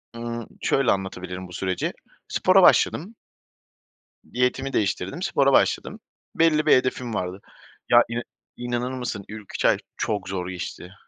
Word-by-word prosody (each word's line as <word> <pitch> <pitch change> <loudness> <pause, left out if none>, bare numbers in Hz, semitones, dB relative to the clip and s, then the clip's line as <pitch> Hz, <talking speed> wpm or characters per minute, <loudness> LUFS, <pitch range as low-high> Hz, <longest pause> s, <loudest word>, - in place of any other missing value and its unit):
Iıı, 115 0 -5
şöyle 135 -4 +2
anlatabilirim 95 -1 -4
bu 90 - -13
süreci. 95 0 -2 0.3
Spora - - +4
başladım. 200 +9 +4 1.2
Diyetimi 125 +2 0
değiştirdim, 95 - -1
spora 140 -8 +2
başladım. - - +2 0.4
Belli 155 -2 +3
bir - - +6
hedefim 130 -2 -1
vardı. 95 0 -3 0.5
Ya 120 0 +7
ina 120 +1 -2 0.4
inanır 120 +1 -2
mısın, 120 -6 -4
ilk 105 -1 -10
3 - - -1
ay - - +5 0.2
çok 105 -3 -2
zor 90 -1 -3
geçti. 90 0 -7
115 Hz, 135 wpm, -24 LUFS, 95-130 Hz, 1.2 s, Ya